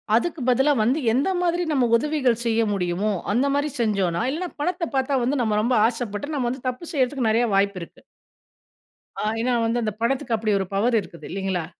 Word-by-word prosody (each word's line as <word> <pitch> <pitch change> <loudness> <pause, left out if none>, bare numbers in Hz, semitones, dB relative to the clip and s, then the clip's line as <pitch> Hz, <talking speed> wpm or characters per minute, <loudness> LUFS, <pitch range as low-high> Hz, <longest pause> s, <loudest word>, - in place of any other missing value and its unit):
அதுக்கு 310 +6 0
பதிலா 265 +4 +3
வந்து 250 +8 +2
எந்த 270 +9 +1
மாதிரி 350 0 +1
நம்ப 265 -4 +2
உதவிகள் 260 -3 +1
செய்ய 230 0 +2
முடியுமோ, 185 +2 -1 0.2
அந்த 245 +6 +2
மாரி 290 +1 0
செஞ்சோன்னா 195 -7 +1
இல்லன்னா, 350 +5 -3
பணத்த 355 +3 -1
பார்த்தா 265 +1 +1
வந்து 260 +2 0
நம்ப 220 -3 +1
ரொம்ப 245 +2 +2
ஆசப்பட்டு 235 +4 -4
நம்ம 250 -4 0
வந்து 255 +1 -6
தப்பு 255 +7 -7
செய்றதுக்கு 260 -3 +1
நெறைய 230 +2 +3
வாய்ப்பு 200 -1 +1
இருக்கு. 170 - -11 1.2
ஆ. - - -2 0.2
ஏன்னா, 250 +1 +1
வந்து 235 +1 0
அந்த 215 - -1
பணத்துக்கு 240 -1 0
அப்டி 215 0 -1
ஒரு 190 - -1
பவர் 230 +4 +2
இருக்குது 170 -3 -11
இல்லைங்களா? 190 -2 -2
240 Hz, 185 wpm, -23 LUFS, 210-275 Hz, 1.2 s, பதிலா